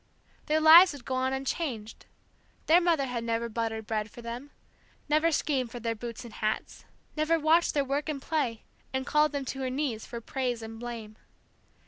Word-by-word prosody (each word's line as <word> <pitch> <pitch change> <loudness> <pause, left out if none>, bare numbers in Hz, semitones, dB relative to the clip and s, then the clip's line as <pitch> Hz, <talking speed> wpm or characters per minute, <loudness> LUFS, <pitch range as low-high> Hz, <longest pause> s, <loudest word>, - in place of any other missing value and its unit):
Their 310 +1 +3
lives 325 +3 +9
would 280 -4 -11
go 260 - -3
on 260 0 0
unchanged, 265 -4 -4 0.6
their 335 +3 +6
mother 330 -5 +2
had 245 -3 -3
never 230 0 -1
buttered 225 -1 -3
bread 215 0 -2
for 240 - -12
them, 240 +5 -6 0.6
never 310 +3 +3
schemed 270 -5 0
for 240 - -7
their 230 0 -1
boots 235 +1 -7
and 230 - -10
hats, 215 0 -3 0.3
never 310 +2 +2
watched 320 +2 +3
their 285 -1 +2
work 285 +3 -2
and 295 -2 -2
play, 265 -6 -2 0.3
and 265 0 -2
called 300 0 +3
them 285 -2 -3
to 270 - -5
her 260 - -1
knees 255 -4 -2
for 235 - -6
praise 245 -1 -3
and 225 0 -8
blame. 230 -3 -7
260 Hz, 185 wpm, -29 LUFS, 230-300 Hz, 0.6 s, lives